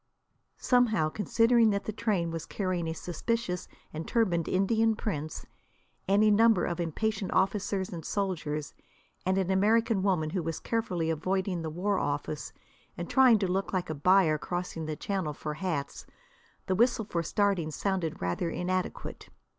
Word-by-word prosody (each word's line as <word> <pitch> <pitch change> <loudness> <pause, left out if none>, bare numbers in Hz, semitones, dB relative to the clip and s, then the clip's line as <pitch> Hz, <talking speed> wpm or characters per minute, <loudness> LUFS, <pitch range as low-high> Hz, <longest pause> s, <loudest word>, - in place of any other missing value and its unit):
Somehow, 225 -10 +3
considering 230 +5 +3
that 200 -1 0
the - - -3
train 200 -7 0
was 165 0 -5
carrying 185 -4 -2
a 160 - -2
suspicious 180 +3 -3 0.3
and 155 +1 -5
turbaned 180 -8 +1
Indian 220 +4 +2
prince, 155 -8 -4 0.6
any 210 +2 +4
number 225 -2 +5
of 170 0 -3
impatient 195 +5 -2
officers 195 0 +1
and 165 -2 -6
soldiers, 155 -7 -2 0.5
and 190 0 +2
an 190 -1 +1
American 215 +2 +3
woman 180 -6 +1
who 185 - -1
was 165 -1 -3
carefully 180 -8 -1
avoiding 185 +2 -1
the 160 - -3
war 190 +5 0
office 145 +1 -3 0.5
and - - -5
trying 260 -4 +6
to 195 -2 0
look 190 +2 -1
like 180 -3 -1
a - - -1
buyer 160 0 +4
crossing 175 -1 -4
the 155 - -3
Channel 185 -3 -2
for 150 +1 -5
hats, 155 -4 -4 0.6
the 190 - 0
whistle 230 +2 +2
for 175 -5 -2
starting 190 -1 +1
sounded 185 0 -2
rather 90 - -1
inadequate. 185 +2 -3
185 Hz, 155 wpm, -29 LUFS, 165-210 Hz, 0.6 s, trying